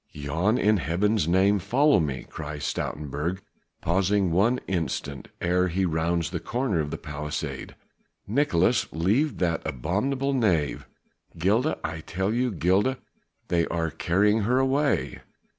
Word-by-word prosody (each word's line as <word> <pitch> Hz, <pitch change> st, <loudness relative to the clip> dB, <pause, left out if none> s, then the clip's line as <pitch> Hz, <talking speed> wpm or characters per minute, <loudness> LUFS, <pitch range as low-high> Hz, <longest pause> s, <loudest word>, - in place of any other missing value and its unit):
"Jan, 80 Hz, +10 st, 0 dB
in 105 Hz, -3 st, +3 dB
Heaven's 90 Hz, +4 st, +1 dB
name, 95 Hz, +3 st, +3 dB
follow 130 Hz, -, +3 dB
me!" 70 Hz, -6 st, -2 dB
cries 75 Hz, 0 st, -7 dB
Stoutenburg, 75 Hz, +7 st, -3 dB, 0.4 s
pausing 95 Hz, +2 st, +1 dB
one 110 Hz, +9 st, +3 dB
instant 75 Hz, -6 st, -3 dB
ere 90 Hz, +1 st, +2 dB
he 95 Hz, +2 st, 0 dB
rounds 85 Hz, -1 st, 0 dB
the -, -, -2 dB
corner 120 Hz, -8 st, -1 dB
of 75 Hz, -2 st, -1 dB
the -, -, -4 dB
palisade. 75 Hz, 0 st, -5 dB, 0.5 s
"Nicolaes, 115 Hz, -, +2 dB
leave 105 Hz, -, +1 dB
that 85 Hz, -2 st, 0 dB
abominable 105 Hz, -, -1 dB
knave! 95 Hz, -, +1 dB, 0.5 s
Gilda, 110 Hz, -, +1 dB
I 80 Hz, +1 st, -3 dB
tell 95 Hz, +6 st, -2 dB
you! 125 Hz, +2 st, +1 dB
Gilda! 100 Hz, -, +1 dB, 0.5 s
They 85 Hz, -1 st, +2 dB
are 80 Hz, -2 st, -1 dB
carrying 105 Hz, +9 st, +2 dB
her 120 Hz, +5 st, +2 dB
away!" 135 Hz, +2 st, +1 dB
90 Hz, 130 wpm, -26 LUFS, 80-110 Hz, 0.5 s, in